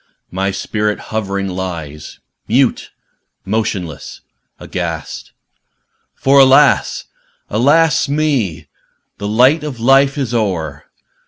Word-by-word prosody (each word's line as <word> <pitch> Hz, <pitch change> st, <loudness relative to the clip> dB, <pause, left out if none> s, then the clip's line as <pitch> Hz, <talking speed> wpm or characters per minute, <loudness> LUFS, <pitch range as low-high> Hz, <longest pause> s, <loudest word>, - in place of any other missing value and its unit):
my 95 Hz, +1 st, -1 dB
spirit 105 Hz, +2 st, -2 dB, 0.2 s
hovering 100 Hz, -2 st, -2 dB
lies 85 Hz, -5 st, -6 dB, 0.3 s
Mute, 125 Hz, +3 st, +1 dB, 0.6 s
motionless, 95 Hz, -6 st, -4 dB, 0.4 s
aghast! -, -, -5 dB, 0.8 s
For, 140 Hz, +1 st, +3 dB
alas! 135 Hz, 0 st, +4 dB, 0.5 s
alas! 145 Hz, +9 st, +3 dB
with 140 Hz, +1 st, -2 dB
me 130 Hz, -, -1 dB, 0.5 s
The 100 Hz, -, -4 dB
light 130 Hz, +9 st, +3 dB
of 140 Hz, -6 st, -6 dB
Life 135 Hz, +4 st, +3 dB
is 130 Hz, -4 st, -2 dB
o'er! 85 Hz, -11 st, -2 dB
110 Hz, 95 wpm, -16 LUFS, 95-135 Hz, 0.8 s, alas